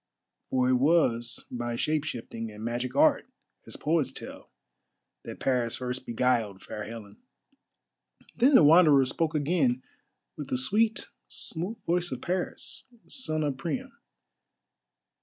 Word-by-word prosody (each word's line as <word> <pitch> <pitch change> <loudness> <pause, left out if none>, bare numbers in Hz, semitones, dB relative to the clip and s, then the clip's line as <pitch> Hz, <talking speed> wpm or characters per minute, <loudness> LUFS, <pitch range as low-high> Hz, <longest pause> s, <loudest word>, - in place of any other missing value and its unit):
For 130 -1 +2
it 130 - +4
was 125 -5 +2
by 120 -1 -3
shape 150 +4 0
shifting 115 -4 -5
and 105 +1 -10
magic 120 +2 -3
art, - - +4 0.4
as - - -6
poets 150 -4 +1
tell, - - -9 0.8
that - - -8
Paris 125 -3 0
first 125 0 -5
beguiled 115 -4 0
Fair 105 - -6
Helen. 110 -3 -9 1.2
Then 260 +4 +5
the - - +8
Wanderer 150 -3 +7
spoke 155 +4 -1
again 145 -5 +1 0.5
with 150 - -6
the 130 - -1
sweet, 215 - +1 0.2
smooth 185 +7 -4
voice 175 0 0
of 130 - -4
Paris, 185 +7 -3 0.2
son 155 - -2
of 145 -3 -1
Priam. 245 - -4
135 Hz, 130 wpm, -28 LUFS, 120-165 Hz, 1.2 s, the